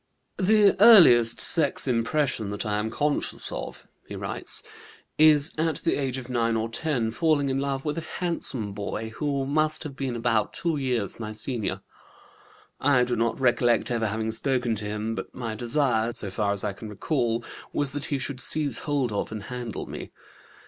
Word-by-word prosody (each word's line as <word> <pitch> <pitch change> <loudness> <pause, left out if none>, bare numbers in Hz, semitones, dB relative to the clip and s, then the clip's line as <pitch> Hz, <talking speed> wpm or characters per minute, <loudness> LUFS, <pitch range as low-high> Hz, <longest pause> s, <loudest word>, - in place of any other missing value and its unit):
"The 205 +1 +4
earliest 140 - +7
sex 150 -4 +5
impression 120 -2 0
that 100 +3 -4
I 105 0 -1
am 110 +1 -2
conscious 145 +5 -2
of," - - -7 0.2
he - - -7
writes, - - -2 0.6
"is 155 0 +5
at 160 0 +1
the - - +1
age 135 -2 -2
of 130 -2 -7
9 115 -2 0
or 110 +1 -2
10 120 -2 -1
falling 145 +1 +1
in 135 0 -1
love 135 0 -3
with 150 +2 -2
a 165 - -10
handsome 135 - -3
boy 105 +2 -5
who 140 -2 -1
must 155 +3 +1
have 145 -4 -7
been 135 -3 -3
about 115 -2 0
two 165 -3 -2
years 125 -8 -1
my 110 -1 -5
senior. 115 -1 -3 1.0
I 135 -3 +3
do 125 0 -1
not 115 +2 -1
recollect 120 -2 +2
ever 115 -2 0
having 110 +1 -2
spoken 125 +1 -1
to 105 - -3
him, 105 +2 -3
but - - -7
my 115 -3 -4
desire, 120 -1 0
so 100 -4 -4
far 100 +1 0
as 100 -1 -1
I 105 -2 -2
can 110 +2 -9
recall, 120 +1 -1 0.3
was 145 -2 +1
that 145 +1 -4
he 145 - -2
should 130 0 -4
seize 150 +1 +1
hold 140 -5 -1
of 105 - -3
and 110 -2 -6
handle 125 -2 -6
me. - - -8
125 Hz, 185 wpm, -25 LUFS, 110-145 Hz, 1.0 s, earliest